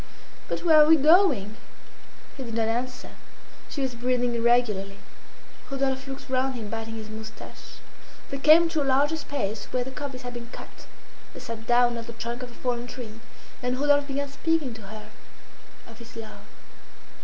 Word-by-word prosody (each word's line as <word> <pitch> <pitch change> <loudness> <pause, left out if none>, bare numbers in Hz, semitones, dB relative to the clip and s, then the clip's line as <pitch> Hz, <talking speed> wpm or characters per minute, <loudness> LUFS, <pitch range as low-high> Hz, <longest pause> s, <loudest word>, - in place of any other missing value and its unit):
"But - - -3
where 315 -2 +8
are 300 - +7
we 320 - +8
going?" 290 - +4 0.8
He 275 - -8
did 230 -3 -5
not 225 -1 +1
answer. 245 +2 -3 0.6
She 280 - -3
was 260 -2 -1
breathing 245 0 0
irregularly. 230 -5 +2 0.7
Rodolphe 270 -1 -1
looked 270 +1 -7
round 260 0 0
him 220 -4 -6
biting 225 0 -4
his 220 -1 -7
moustache. 220 0 -10 0.6
They 275 - -3
came 315 +4 +7
to 320 -2 0
a - - +2
larger 280 +3 +3
space 235 -9 -3
where 250 -1 -1
the 265 - -7
coppice 265 -2 -6
had 245 0 -6
been 235 -1 -7
cut. - - -11 0.5
They - - -7
sat 225 -1 -7
down 240 -1 +4
on 230 - -7
the 235 - -8
trunk 235 +2 -5
of 250 - -6
a 240 - -15
fallen 245 -1 -2
tree, 230 -3 -8 0.4
and 250 0 -1
Rodolphe 285 0 +4
began 280 0 -2
speaking 300 -2 0
to 225 - -10
her 210 0 -10 0.8
of 230 0 -14
his 235 0 -12
love. 215 -3 -9
245 Hz, 180 wpm, -26 LUFS, 230-275 Hz, 0.8 s, where